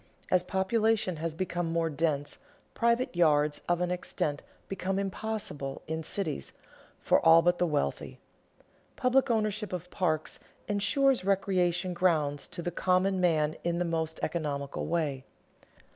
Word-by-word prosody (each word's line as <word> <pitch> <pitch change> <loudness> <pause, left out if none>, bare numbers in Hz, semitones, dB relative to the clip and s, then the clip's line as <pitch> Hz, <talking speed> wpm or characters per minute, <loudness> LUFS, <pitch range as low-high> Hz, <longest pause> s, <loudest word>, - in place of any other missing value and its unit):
As 185 - +5
population 190 0 +1
has 160 0 -3
become 175 -1 -2
more 165 0 +1
dense, 150 -2 -1 0.3
private 235 -2 +1
yards 150 -3 +3
of 175 0 +2
any 180 0 0
extent 150 -4 -2 0.3
become 195 0 -2
impossible, 195 -8 -3
in 160 +1 -3
cities, 160 - -2 0.5
for - - +2
all 165 0 +7
but 175 +1 +2
the 180 - +2
wealthy. 145 - -2 0.8
Public 260 +1 +2
ownership 215 -2 0
of 180 0 -5
parks 160 -5 -1 0.3
insures 250 +5 +2
recreation 185 -2 +1
grounds 155 -5 +1
to 170 - -7
the 175 - -2
common 185 +2 +1
man 155 -3 +2
in 170 0 0
the 175 - 0
most 160 -1 -2
economical 145 -4 -2
way. 150 -6 -1
175 Hz, 135 wpm, -29 LUFS, 155-195 Hz, 0.8 s, all